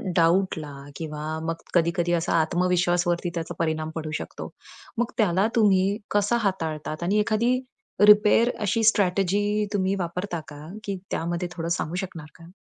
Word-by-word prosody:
डाऊटला 165 Hz, -3 st, +2 dB, 0.2 s
किंवा 150 Hz, -1 st, -6 dB, 0.2 s
मग 165 Hz, -, -1 dB, 0.2 s
कधी-कधी 175 Hz, 0 st, +2 dB
असा 170 Hz, -1 st, 0 dB
आत्मविश्वासवरती 175 Hz, +1 st, +1 dB
त्याचा 165 Hz, -1 st, -4 dB
परिणाम 155 Hz, -1 st, -1 dB
पडू 155 Hz, -1 st, -4 dB
शकतो. -, -, -7 dB, 0.5 s
मग 240 Hz, 0 st, 0 dB
त्याला 195 Hz, -2 st, +3 dB
तुम्ही 200 Hz, -2 st, +3 dB
कसं 205 Hz, +3 st, +2 dB
हाताळतात. 160 Hz, -5 st, -2 dB
आणि 200 Hz, +5 st, +2 dB
एखादी 230 Hz, +4 st, +2 dB, 0.4 s
रिपेअर 210 Hz, +3 st, +6 dB
अशी 215 Hz, +2 st, +1 dB
स्ट्रॅटेजी 205 Hz, +1 st, +2 dB
तुम्ही 195 Hz, -1 st, +1 dB
वापरता 175 Hz, +1 st, -3 dB
का? 145 Hz, 0 st, -10 dB, 0.2 s
की 200 Hz, -1 st, -3 dB
त्यामध्ये 170 Hz, +2 st, -2 dB
थोडं 165 Hz, -1 st, -3 dB
सांगू 170 Hz, -1 st, -2 dB
शकणार 165 Hz, -5 st, -8 dB
का? 165 Hz, 0 st, -14 dB
180 Hz, 140 wpm, -25 LUFS, 165-205 Hz, 0.5 s, रिपेअर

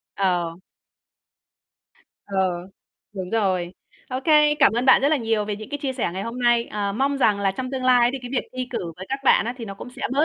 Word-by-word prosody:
Ờ. 175 Hz, -4 st, 0 dB, 1.7 s
Ờ. 200 Hz, -, -6 dB, 0.8 s
Đúng 185 Hz, -3 st, -6 dB
rồi. 185 Hz, -5 st, 0 dB, 0.4 s
OK, 255 Hz, +1 st, -4 dB, 0.4 s
cảm -, -, +5 dB
ơn 240 Hz, +2 st, 0 dB
bạn 260 Hz, -, +6 dB
rất 280 Hz, -, +4 dB
là 310 Hz, -, +3 dB
nhiều 225 Hz, -4 st, 0 dB
về 205 Hz, 0 st, -3 dB
những 215 Hz, +1 st, -9 dB
cái 290 Hz, -, -3 dB
chia 270 Hz, -2 st, -1 dB
sẻ 250 Hz, -9 st, -2 dB
ngày 190 Hz, +2 st, -4 dB
hôm 230 Hz, +4 st, -5 dB
nay, 240 Hz, -1 st, +3 dB
ờ, 205 Hz, -1 st, -3 dB
mong 275 Hz, +6 st, 0 dB
rằng 210 Hz, -6 st, +3 dB
là 195 Hz, -1 st, +2 dB
trong 255 Hz, +5 st, -5 dB
tương 265 Hz, -1 st, -3 dB
lai 245 Hz, -1 st, +5 dB
thì 270 Hz, -, -3 dB
cái 245 Hz, -, -7 dB
việc 265 Hz, -, -2 dB
thi 255 Hz, 0 st, -2 dB
cử 175 Hz, -9 st, -4 dB
với 190 Hz, -, -8 dB
các 270 Hz, -, -2 dB
bạn -, -, +5 dB
á 240 Hz, -, -3 dB
thì 235 Hz, -, -5 dB
nó 200 Hz, -2 st, -7 dB
cũng 230 Hz, +5 st, -10 dB
sẽ -, -, -11 dB
bớt 290 Hz, +4 st, +3 dB
230 Hz, 235 wpm, -23 LUFS, 195-255 Hz, 1.7 s, bạn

